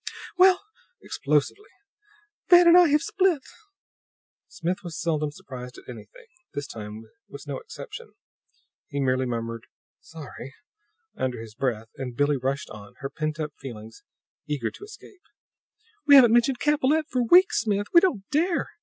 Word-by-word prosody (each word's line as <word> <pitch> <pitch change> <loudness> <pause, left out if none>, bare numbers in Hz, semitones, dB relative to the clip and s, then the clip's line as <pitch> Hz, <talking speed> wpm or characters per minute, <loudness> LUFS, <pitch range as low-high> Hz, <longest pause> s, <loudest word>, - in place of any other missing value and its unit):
"Well," 370 0 +6 0.4
explosively, 150 - -1 0.8
"Van 350 -1 +8
and 340 - +8
I 360 -1 +7
have 300 +1 +2
split!" 370 -8 +1 1.0
Smith 180 +2 -3
was 170 -3 -7
seldom 155 -3 -1
surprised 125 -3 -10
at - - -15
anything. 110 -4 -12 0.3
This 145 - -3
time 105 -2 -8 0.3
was - - -10
no - - -5
exception. 470 0 -10 0.7
He 140 -3 -4
merely 130 -1 +1
murmured 115 -1 -5 0.3
"Sorry" 145 -4 -11 0.6
under 125 -2 -3
his 110 -1 -10
breath; 115 -2 -3
and 125 -3 -6
Billie 145 0 +2
rushed 135 +2 -3
on, 105 -1 -12
her 135 0 -5
pent 155 +1 -4
up 150 -2 -4
feelings 115 -4 -10 0.5
eager 140 -6 -2
to - - -13
escape. 410 -2 -14 0.9
"We 285 - +9
haven't 240 -4 +8
mentioned 240 +2 +3
Capellette 300 +2 +1
for 255 - -1
weeks, 365 - +5
Smith! 205 -2 -1
We 340 - +8
don't 255 - 0
dare! 335 +4 0
155 Hz, 145 wpm, -25 LUFS, -, 1.0 s, We